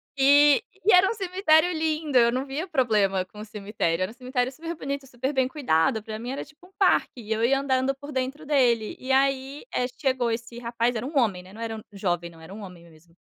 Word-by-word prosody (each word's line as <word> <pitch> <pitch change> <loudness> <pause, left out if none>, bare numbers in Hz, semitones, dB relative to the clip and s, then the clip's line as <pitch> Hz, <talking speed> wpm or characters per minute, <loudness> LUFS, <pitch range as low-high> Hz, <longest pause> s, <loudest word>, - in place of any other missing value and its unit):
E 285 +1 +6 0.3
e - - +7
era 365 +2 +6
um - - -1
cemitério 365 -5 +3
lindo, 310 -3 0
eu 235 -1 +5
não 260 +2 -2
via 285 +6 -4
problema 210 - +1
com 210 +3 -15
o 215 - -7
cemitério, 200 -5 -2
era 185 - -2
um - - -13
cemitério 255 -1 -1
super 330 +4 -6
bonito, 280 -3 -5
super 260 +3 -4
bem 260 -1 +2
cuidado, 220 - +1
para 215 0 -6
mim 240 +3 -6
era 275 - -5
tipo 305 +4 -20
um 370 - -20
parque, 380 - +3
e 220 -2 -9
eu 225 +1 -1
ia 270 +3 +3
andando 265 -1 +1
por 285 +2 -11
dentro 265 +4 -3
dele, 245 -7 +2
e 260 +1 -5
aí, 270 - +1
eh, 250 - +1
chegou 260 -5 +1
esse 235 +1 -5
rapaz, 235 0 -1
era 220 +3 -3
um 285 - -5
homem, 195 -7 0
né, 185 - -15
não 220 - -13
era 225 -1 -5
jovem, 175 -4 -2
não, 165 -1 -16
era 160 +4 -11
um 215 - -9
homem 175 -3 -11
mesmo, 165 +1 -22
255 Hz, 235 wpm, -25 LUFS, 215-280 Hz, 0.3 s, e